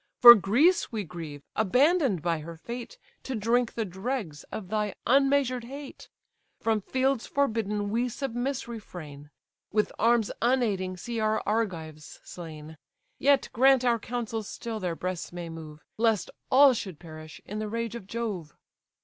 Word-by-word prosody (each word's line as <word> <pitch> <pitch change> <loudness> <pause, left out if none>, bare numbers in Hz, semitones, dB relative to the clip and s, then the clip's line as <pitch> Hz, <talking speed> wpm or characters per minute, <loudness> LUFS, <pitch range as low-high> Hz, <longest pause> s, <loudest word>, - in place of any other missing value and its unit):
For 240 -1 +13
Greece 245 - +3
we 220 -3 -2
grieve, 160 -5 -8
abandon'd 250 - +3
by 170 -2 0
her 165 +2 -8
fate 240 - -7 0.2
To 265 - -4
drink 230 +2 +1
the 225 - -1
dregs 190 - -4
of 190 -4 -7
thy 210 -1 -1
unmeasured 270 -2 +3
hate. 275 +2 -9 0.5
From 220 -2 +1
fields 260 +3 0
forbidden 215 -6 0
we 240 +3 +1
submiss 255 +1 -3
refrain, 155 -11 -9 0.4
With 210 0 +1
arms 230 -1 +3
unaiding 210 -7 +1
see 235 +4 -4
our 215 0 +1
Argives 165 -8 -3
slain; 155 -2 -9 0.4
Yet 280 -1 +3
grant 260 +1 +5
our 235 -1 +3
counsels 225 -2 -4
still 225 -2 -5
their 180 -4 -2
breasts 180 0 -4
may 175 -1 -6
move, 155 -2 -10
Lest 225 -3 +1 0.2
all 275 0 +7
should 190 -8 -5
perish 155 -2 -11
in 210 +2 -5
the 215 -1 -3
rage 230 0 -3
of 235 -5 -8
Jove." 200 -9 -4
220 Hz, 150 wpm, -28 LUFS, 180-245 Hz, 0.5 s, For